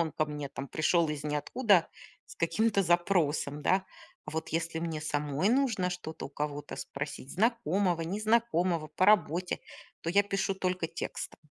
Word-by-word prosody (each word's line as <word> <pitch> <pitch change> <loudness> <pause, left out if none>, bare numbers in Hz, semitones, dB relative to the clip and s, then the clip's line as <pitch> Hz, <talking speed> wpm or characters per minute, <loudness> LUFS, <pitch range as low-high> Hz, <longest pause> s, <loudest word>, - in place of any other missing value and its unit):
Он 165 -1 +1
ко 155 - +1
мне 150 -2 -5
там 135 0 -7
пришел 165 +2 +2
из 150 -1 -3
ниоткуда 170 - +2 0.4
с - - -12
каким-то 200 +4 +2
запросом, 170 -5 +1
да. 190 +4 +3 0.4
А - - -5
вот 160 +1 -3
если 165 0 -2
мне 165 -2 -3
самой 150 +3 0
нужно 235 -8 +2
что-то 160 -3 -6
у - - -13
кого-то 145 0 -4
спросить, 140 -1 -6
знакомого, 195 -5 +1
незнакомого 185 -3 +1
по 185 - +1
работе, 180 -3 +3 0.4
то - - -4
я 200 +3 +5
пишу 195 -1 -1
только 185 -2 -1
текстом. 165 - -5
170 Hz, 155 wpm, -30 LUFS, 150-195 Hz, 0.4 s, я